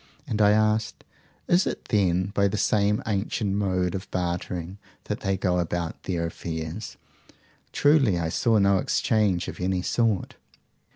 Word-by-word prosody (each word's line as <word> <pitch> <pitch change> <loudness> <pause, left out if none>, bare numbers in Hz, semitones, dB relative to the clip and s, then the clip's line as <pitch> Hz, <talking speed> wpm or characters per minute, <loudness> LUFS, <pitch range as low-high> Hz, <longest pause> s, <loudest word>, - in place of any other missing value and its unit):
And 110 -7 -1
I 105 - +6
asked, 110 +1 +1 0.4
Is 175 +2 +3
it - - -4
then 95 -3 +1
by 100 -1 +3
the 100 - -2
same 105 0 +1
ancient 100 -1 -1
mode 95 -3 0
of 95 0 -5
barter 90 0 -3 0.3
that - - -4
they 95 0 -1
go 90 -1 +1
about 85 -1 -3
their 85 -3 -1
affairs? 80 +4 -6 0.7
Truly 140 - +3
I 80 -1 -1
saw 115 +6 +2
no 100 -1 +4
exchange 100 -3 +1
of - - -7
any 90 0 0
sort. 115 -5 0
95 Hz, 150 wpm, -25 LUFS, 90-105 Hz, 0.7 s, I